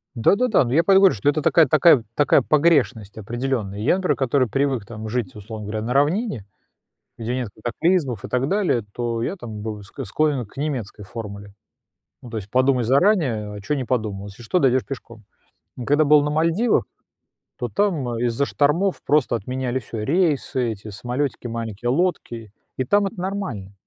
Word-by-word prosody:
Да, 115 +9 +4
да, 250 +2 +1
да. 205 - +4
Ну, 120 - -3
я 160 +5 +4
поэтому 195 0 +6
говорю, 195 - +6
что 105 +7 -1
это 150 +1 +1
такая 165 +2 +5
такая 150 -1 +5
такая 145 - +4
погрешность 140 -10 +2
определённая. 115 -2 -3
Я, 125 +11 +3
например, 190 -1 0
который 130 -1 +1
привык 135 -2 -1
там 110 -2 -7
жить, 125 +2 -3
условно 105 0 -8
говоря, 110 +1 -3
на 115 +3 -2
равнине, 145 - +1 0.7
где 115 +1 -3
нет 125 -3 -2
катаклизмов 125 - -1
и - - -5
так 125 +2 0
далее, 185 - +1
то 115 -1 -2
я 190 - -2
там 110 - -8
бы 105 -2 -5
склонен 135 +6 -2
к 100 - -22
немецкой 130 -8 -4
формуле. 100 -1 -8 0.7
Ну 120 - -10
то 115 - -5
есть, 100 -1 -6
подумай 130 0 +2
заранее, 130 - +2
а 105 - -7
что 150 - -1
не 130 - -2
подумал, 105 -5 -2
если 100 +4 -11
что, 120 +11 +1
дойдёшь 130 -4 +2
пешком. 115 -5 -9 0.6
Когда 145 +4 +3
был 150 0 +6
на 150 - -1
Мальдивах, 165 +9 +2 0.7
то - - -2
там 150 - 0
из-за 120 +3 0
штормов 165 +8 +1
просто 145 -4 +2
отменяли 125 +3 -2
всё: 110 -2 -6
рейсы, 140 - +1
эти 105 +1 -11
самолетики 125 +5 -3
маленькие, 115 -1 -4
лодки, 125 - -1 0.2
и 130 - 0
там 205 +9 +3
это 195 - -8
нормально. 180 - -4
125 Hz, 180 wpm, -22 LUFS, 110-150 Hz, 0.7 s, поэтому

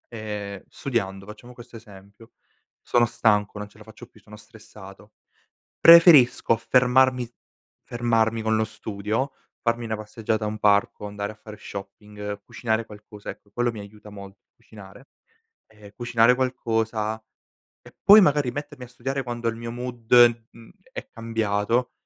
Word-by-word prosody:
Ehm, 105 -3 -6
studiando, 95 -7 -4
facciamo 120 +4 -12
questo 120 -1 -13
esempio, 105 0 -16 0.5
sono 120 -1 +2
stanco, 110 -3 0
non 105 0 -7
ce - - -23
la 105 - -15
faccio 110 - -14
più, - - -22
sono - - -15
stressato. - - -15 0.7
Preferisco 165 -9 +7
fermarmi 125 +1 +2 0.6
fermarmi 115 -1 0
con 110 0 +1
lo 110 - +1
studio, 110 +4 -4 0.3
farmi 115 0 -1
una 110 -1 -3
passeggiata 110 +1 -4
a - - -1
un 105 0 -5
parco, 105 0 +1
andare 100 0 -5
a - - -14
fare 105 0 -12
shopping, 105 +1 -9
cucinare 110 -1 -2
qualcosa- 105 -1 -12
ecco, 100 - -18
quello 120 +3 -1
mi 110 - -9
aiuta 105 +1 -13
molto, 100 -1 -12
cucinare. 105 +5 -15 0.6
Ehm, 105 -2 -16
cucinare 120 0 +3
qualcosa, 115 -4 -2 0.6
e - - -17
poi 210 +2 +9
magari 145 -6 +2
mettermi 145 0 -8
a - - -15
studiare 135 +3 -4
quando 120 -1 -4
il 115 - -5
mio 115 0 -6
mood 120 -1 +3
mhmm, 115 -1 -16 0.2
è - - -7
cambiato 115 +1 -1
115 Hz, 145 wpm, -24 LUFS, 105-120 Hz, 0.7 s, poi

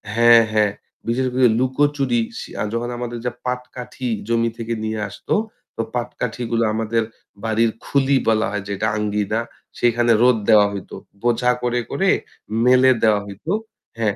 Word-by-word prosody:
হ্যাঁ, 115 0 +7
হ্যাঁ। 105 -1 +3 0.4
বিশেষ 125 +3 +1
করে 130 0 +5
লুকোচুরি 130 -1 +1 0.2
শি - - -8
আ - - +1
যখন 120 +1 -2
আমাদের 120 -1 -4
ওইযে 125 +1 -3
পাটকাঠি 125 0 -5 0.2
জমি 115 0 +1
থেকে 115 0 -3
নিয়ে 110 0 -2
আসত, - - -15 0.5
তো - - -1
পাটকাঠিগুলা 120 -1 -2
আমাদের 115 +1 0 0.4
বাড়ির 115 +1 +2 0.2
খুলি 140 0 +2
বলা 110 -1 +3
হয় 105 -1 -3
যেটা 100 +2 -1
আঙ্গিনা, 105 0 -1 0.4
সেইখানে 120 0 +3
রোদ 125 -1 +5
দেওয়া 105 -2 +7
হইত। 100 - -7 0.3
বোঝা 120 +1 +2
করে, 120 0 0
করে - - +1 0.6
মেলে 130 +1 +6
দেওয়া 110 -2 +4
হইত। 100 +7 -11 0.5
হ্যাঁ, 110 -3 0
115 Hz, 150 wpm, -21 LUFS, 110-125 Hz, 0.6 s, হ্যাঁ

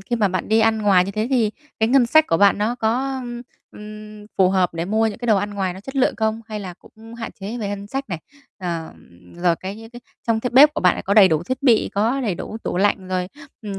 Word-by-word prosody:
khi 240 +5 -3
mà 210 -4 +2
bạn 185 0 -3
đi 220 +1 +3
ăn 220 0 +3
ngoài 190 -3 +4
như 195 - -4
thế 215 +2 -2
thì 235 -5 +2 0.3
cái 220 - +3
ngân 255 -1 +4
sách 315 +5 +5
của - - +2
bạn 200 +2 +4
nó 215 +3 0
có, 255 +3 -1
ưm, 240 -1 -7 0.3
ừm, 210 0 -11
phù 185 -1 +5
hợp 185 -3 +1
để 165 0 -2
mua 220 +3 +1
những 215 - -4
cái 240 - -5
đồ 220 -3 +4
ăn 205 +1 -2
ngoài 190 -2 -1
nó 190 - -10
chất 270 +7 -9
lượng 265 - +2
không? 220 0 -1
Hay 215 -2 -5
là 185 -3 -7
cũng 225 +5 -15
hạn 235 -1 -6
chế 215 +5 -5
về 210 -3 -3
ngân 200 0 -5
sách 270 +5 -5
này, 175 -5 -4 0.4
ờm, 160 - -8
rồi 175 -1 +1
cái 190 +2 -7
những 225 +1 -12
cái 240 - -11 0.3
trong 230 -1 +2
bếp 295 +4 +7
của - - -2
bạn 180 - +3
là - - -5
có 200 - 0
đầy 200 -3 +8
đủ 160 -1 0
thiết 255 +9 -4
bị, 240 -5 +3
có 225 +7 +1
đầy 215 -8 -1
đủ 215 - -7
tủ - - -3
lạnh, 195 -1 +1
rồi, 185 -1 -2 0.3
ừm, 200 -2 -5
210 Hz, 270 wpm, -21 LUFS, 190-230 Hz, 0.4 s, đầy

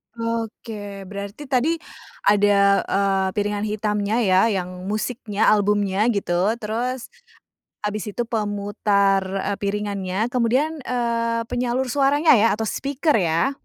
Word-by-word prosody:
Oke, 225 -3 -5
berarti 200 +7 -7
tadi 270 +6 +2 0.5
ada, 200 -1 +4
eee, 195 -1 +1
piringan 205 0 -1
hitamnya 210 0 -1
ya, 185 -2 +4
yang 185 -3 -3
musiknya, 215 0 0
albumnya 205 0 +2
gitu. 200 -2 +1
Terus 235 +4 -3 0.7
abis 210 0 -2
itu 240 - 0
pemutar, 205 -3 +1
eee, 195 +1 -2
piringannya 200 +1 -2
kemudian, 255 +6 +1
eee, 230 -1 0
penyalur 245 +1 0
suaranya 290 +4 +4
ya, 225 +1 +4
atau 220 +1 -3
speaker 285 +3 0
ya? 170 +6 +1
210 Hz, 115 wpm, -22 LUFS, 200-235 Hz, 0.7 s, ada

